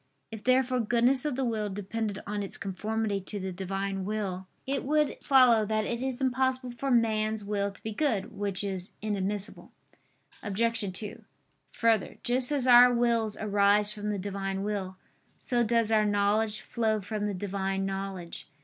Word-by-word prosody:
If 220 -1 -8
therefore 255 0 +3
goodness 240 +4 +2
of 295 -4 0
the 265 0 -1
will 215 -3 -1
depended 205 +1 -4
on 205 0 -3
its 200 - -2
conformity 210 +1 -2
to 205 +2 -5
the 190 0 -4
Divine 195 +1 -3
will, 190 -2 -3 0.2
it 275 +1 -1
would 300 +1 +1
follow 250 -5 +6
that 215 0 0
it 235 +2 -3
is 260 -1 -2
impossible 260 -1 0
for 240 +3 -4
man's 220 -3 +2
will 200 -1 -1
to 195 - -18
be 220 - -4
good. 220 -6 0
Which 200 -1 -3
is 190 -2 -4
inadmissible. 205 -1 -3 0.7
Obj. 225 0 -1
2: 205 +3 -8 0.5
Further, 225 -4 +1
just 250 +2 +1
as 280 -4 0
our 245 0 +8
wills 235 -3 +1
arise 205 0 +3
from 210 -1 -4
the 205 - -1
Divine 195 0 -3
will, 195 -3 -3 0.4
so 245 -1 0
does 230 -1 +1
our 215 -1 +4
knowledge 205 +1 +1
flow 220 -2 0
from 210 +1 -3
the 205 - -2
Divine 195 0 -2
knowledge. 195 -3 -5
210 Hz, 165 wpm, -29 LUFS, 200-235 Hz, 0.7 s, our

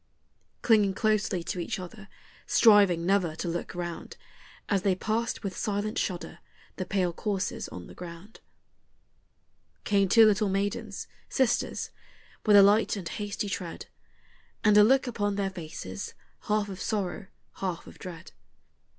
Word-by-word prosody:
Clinging 210 -4 +4
closely 210 -5 +1
to 180 - -4
each 175 - -3
other, 205 +3 -9 0.4
striving 200 -7 +5
never 185 -4 +2
to 175 - -4
look 170 +1 -4
round 175 -1 -6 0.5
As 200 -2 +1
they 190 -1 +2
passed 225 +5 -2
with 195 -2 -4
silent 210 +1 -2
shudder 175 -3 -4 0.4
the 185 - -4
pale 185 -3 0
corses 200 0 -3
on 90 -1 -8
the - - -12
ground, 175 +4 -10 1.4
Came 200 -2 +2
two 225 +2 +8
little 210 -1 +3
maidens, 200 +2 -2 0.2
sisters, 260 -3 0 0.6
with 210 - +7
a 200 - +10
light 205 +3 +4
and 190 -5 -5
hasty 205 +3 -4
tread, 185 -3 -5 0.8
And 210 -1 +5
a 210 - +9
look 265 +6 +4
upon 205 -4 -1
their 195 -1 -1
faces, 155 - -7 0.3
half 210 -1 +1
of 190 -1 -7
sorrow, 200 -1 -2 0.3
half 185 -3 -3
of - - -14
dread. 175 -3 -9
200 Hz, 140 wpm, -28 LUFS, 180-210 Hz, 1.4 s, a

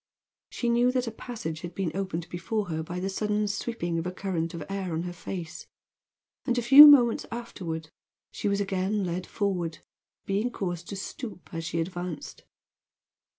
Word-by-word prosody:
She 240 - -3
knew 240 +1 +4
that 255 -1 +1
a 230 - -3
passage 215 -9 -6
had 175 -1 -7
been 190 -5 -1
opened 185 -3 -3
before 190 +4 -2
her 160 -1 -2
by 175 +3 -5
the 190 - -2
sudden 210 +1 0
sweeping 200 -5 -2
of 165 - -3
a - - -2
current 175 -3 -3
of 165 - -5
air 195 -3 -3
on 160 +1 -1
her 175 0 -5
face; 175 -1 -7 0.8
and 245 -2 0
a 245 - +1
few 275 +5 +12
moments 245 -6 +6
afterward, 165 -9 -5 0.4
she - - -3
was 200 0 +1
again 195 +1 0
led 180 0 -3
forward, 180 -6 -1 0.5
being 205 +5 0
caused 175 -6 -4
to 200 - -4
stoop 200 -1 -7
as 165 0 -4
she 165 - -2
advanced. 175 -1 -5
190 Hz, 175 wpm, -28 LUFS, 170-215 Hz, 0.8 s, few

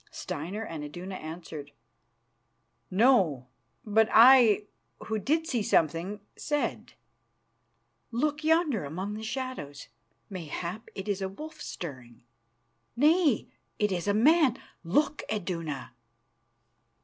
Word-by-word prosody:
Steinar 185 +9 -5
and 160 -6 -6
Iduna 175 +6 -7
answered, 155 -4 -8 1.2
"No," 185 - +3 0.4
but 220 +1 +3
I, 230 -3 +7 0.4
who 220 -1 -2
did 315 - +1
see 245 -7 -1
something, 175 +3 +1
said: 295 -1 -2 1.2
"Look 295 +6 -1
yonder 315 - +2
among 185 +8 -4
the 215 - -6
shadows. 220 - -5 0.4
Mayhap 185 +3 -6
it 195 +1 -6
is 200 -1 -1
a 190 - -2
wolf 310 +10 -9
stirring. 130 -9 -8 0.7
Nay, 300 - +3 0.3
it 210 -1 +1
is 180 0 -2
a 205 - +3
man. 280 +2 +4 0.3
Look, 290 - +1
Iduna." 165 - -4
205 Hz, 105 wpm, -28 LUFS, 165-260 Hz, 1.2 s, I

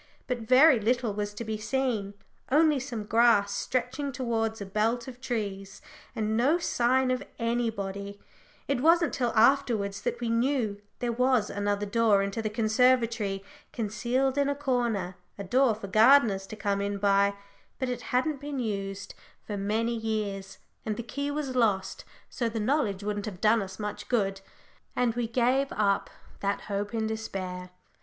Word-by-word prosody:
But 250 -2 -2
very 255 +4 +6
little 235 0 0
was 205 0 -3
to 235 - -5
be 220 -1 -4
seen 215 -3 -1 0.4
only 300 0 +4
some 245 -5 -5
grass 210 -2 +3
stretching 260 +3 -2
towards 225 -4 -2
a 200 - -5
belt 225 +5 0
of 250 -1 -10
trees, 200 -6 -4 0.4
and 220 0 -1
no 270 +9 +3
sign 255 -5 +1
of 255 0 0 0.2
anybody 205 -4 -2 0.5
it 275 -3 0
wasn't 335 +1 +4
till 245 -3 0
afterwards 225 -5 +3
that 240 -1 -2
we 240 - -2
knew 230 -3 0 0.2
there 240 -1 -1
was 250 -2 +2
another 205 0 -1
door 205 -1 +3
into 200 +3 -3
the 215 - -2
conservatory, 220 -2 +2 0.3
concealed 245 +5 -1
in 280 0 +2
a 285 - 0
corner 240 -10 -1 0.2
a 200 - -5
door 245 +4 +3
for 210 - -8
gardeners 215 -1 +5
to 215 - -7
come 200 -1 -1
in 200 0 -2
by, 200 0 +3 0.4
but 260 - -2
it 250 -1 -3
hadn't 275 +3 0
been 290 -1 -5
used 200 -4 -4 0.3
for 210 - -4
many 215 +4 0
years, 205 -4 -3 0.3
and 215 -2 -3
the 235 - -4
key 280 +4 -4
was 285 -3 -3
lost, 210 -6 0 0.2
so 235 -2 -2
the 225 0 -4
knowledge 215 -5 0
wouldn't 205 0 -3
have 185 -4 -6
done 220 +2 +4
us 190 -1 -7
much 210 -1 -5
good 195 -5 0 0.5
and 245 -2 +1
we 240 0 -2
gave 255 +4 +2
up 200 -2 +1 0.3
that 200 0 -1
hope 205 0 -3
in 225 -1 -1
despair. 185 -5 -5
225 Hz, 165 wpm, -28 LUFS, 200-250 Hz, 0.5 s, very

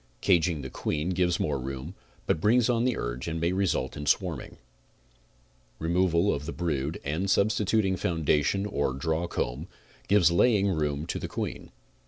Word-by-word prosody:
Caging 85 -3 +2
the 65 - -7
queen 75 +4 -2
gives 90 -1 +1
more 70 -3 0
room, 65 +5 -6 0.3
but 80 - 0
brings 120 +4 +4
on 120 0 +1
the 125 -2 +1
urge - - -4
and 80 0 -2
may 85 +2 +1
result 95 -8 0
in 75 0 -6
swarming. - - -1 1.2
Removal 85 +2 +2
of 75 +1 -5
the - - -3
brood 80 -3 -2
and 80 +7 -2
sub 100 +2 +4
stituting 105 -2 +1
foundation 80 +3 +1
or 70 -9 -1
drawn 80 +5 -1
comb 70 +1 -3 0.4
gives 95 -4 +5
laying 100 +2 +3
room 75 -4 -1
to - - -3
the - - -4
queen. - - -5
85 Hz, 165 wpm, -27 LUFS, 75-95 Hz, 1.2 s, gives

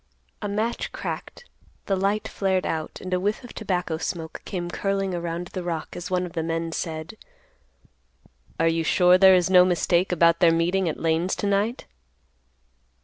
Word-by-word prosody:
A 205 - -2
match 215 +4 -2
cracked. - - -6 0.4
The 195 - +1
light 200 +3 0
flared 190 -2 0
out, 160 -1 -3
and 185 0 -5
a 180 - +2
whiff 205 +6 -1
of 245 - -10
tobacco 180 -6 -2
smoke 160 -2 -5
came 175 -3 -4
curling 195 -1 -1
around 170 0 -4
the 185 - -5
rock, 170 -3 -4
as 175 0 -6
one 180 -1 0
of 170 - -9
the 165 - -1
men 165 0 -2
said: 160 -1 -4 1.5
"Are 165 - +3
you 165 0 +1
sure 180 +3 +4
there 190 -1 +8
is 180 0 +2
no 180 -1 +8
mistake 180 0 +1
about 170 -1 +4
their 170 -1 +6
meeting 170 +2 +1
at 155 - -5
Lane's 165 +3 +1
to - - -4
night?" 205 +4 0
180 Hz, 175 wpm, -24 LUFS, 165-195 Hz, 1.5 s, there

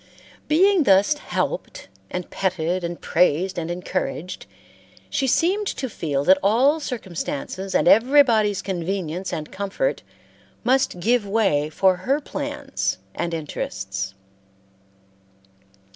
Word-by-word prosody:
Being 360 +1 +4
thus 200 +8 +5
helped - - -4 0.2
and 180 -1 -4
petted 185 -1 -1
and 170 0 -4
praised 180 +2 +1
and 165 0 -4
encouraged 180 0 -4 0.6
she 270 - 0
seemed 380 - +2
to 265 - -3
feel 150 - -2
that 190 +4 +5
all 255 +10 +3
circumstances 190 - -4
and - - +3
everybody's 225 -3 +5
convenience 185 -1 -3
and 155 -3 -5
comfort 200 - -2 0.6
must 255 -6 +2
give 225 +2 +1
way 195 -9 +1
for 185 +3 +2
her 265 +11 0
plans 295 - -3 0.2
and 170 - -3
interests. 95 - -4
190 Hz, 110 wpm, -23 LUFS, 170-250 Hz, 0.6 s, thus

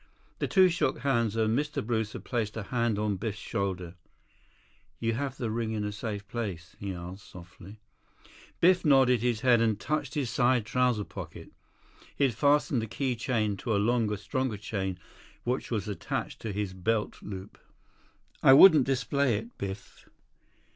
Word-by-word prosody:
The - - 0
two 190 -2 +6
shook 165 -8 0
hands, 115 -5 +1
and 110 0 +2
Mr. 145 -1 -2
Brewster 110 -2 -2
placed 110 -3 -3
a 110 - -3
hand 115 0 0
on 105 -2 0
Biff's 105 +1 -4
shoulder. 95 -6 -3 1.1
"You 115 0 0
have 135 +2 -3
the 115 -3 -2
ring 110 0 -2
in 105 -1 -2
a 105 - -2
safe 105 -1 -5
place?" 100 -8 -5
he 100 -1 -4
asked 90 +1 -8
softly. 90 +3 -12 0.8
Biff 180 +1 +4
nodded 130 -5 +4
his 120 -2 0
head 125 -3 +4
and 110 -3 +1
touched 150 -1 -2
his 135 -6 -1
side 125 -3 +2
trouser 125 -2 +1
pocket. - - -9 0.6
He - - 0
had 130 -3 +3
fastened 140 0 +2
the 110 - -4
key 130 +3 -2
chain 110 -4 -1
to 110 +2 -1
a - - +3
longer, 110 0 +1
stronger 125 +2 -2
chain 95 -2 -3 0.5
which 125 +2 -2
was 105 -4 -2
attached 105 - -4
to 110 - -4
his 100 -1 -3
belt 105 +4 -1
loop. 95 0 -8 0.8
"I 135 - +8
wouldn't 150 -2 +8
display 135 -2 +1
it, 115 +3 -8
Biff." 95 0 -7
115 Hz, 165 wpm, -29 LUFS, 105-130 Hz, 1.1 s, I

